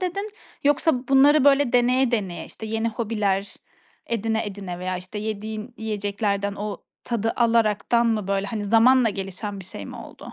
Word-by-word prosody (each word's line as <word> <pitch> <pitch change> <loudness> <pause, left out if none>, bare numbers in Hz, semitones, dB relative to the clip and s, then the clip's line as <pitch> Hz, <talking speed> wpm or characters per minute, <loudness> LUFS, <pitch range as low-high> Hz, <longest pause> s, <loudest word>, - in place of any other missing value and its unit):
dedin 395 +3 -3 0.3
yoksa 285 -2 +2
bunları 275 +2 +6
böyle 280 -2 +4
deneye 250 +1 +3
deneye, 195 -7 -2
işte, 220 - -9
yeni 225 +1 -1
hobiler, 210 -3 -1 0.5
edine 225 -1 -1
edene 195 -3 -6
veya 185 0 -2
işte 185 +4 -7
yediğin 215 +2 -5
yiyeceklerden 205 -1 -2
o 205 0 -5 0.2
tadı 225 -1 -1
alaraktan 235 0 +2
mı, 215 -4 0
böyle, 195 0 0
hani 210 0 -3
zamanla 230 +4 +5
gelişen 195 +1 -5
bir - - -9
şey 100 - -8
mi - - -8
oldu? - - -11
220 Hz, 155 wpm, -24 LUFS, 200-240 Hz, 0.5 s, bunları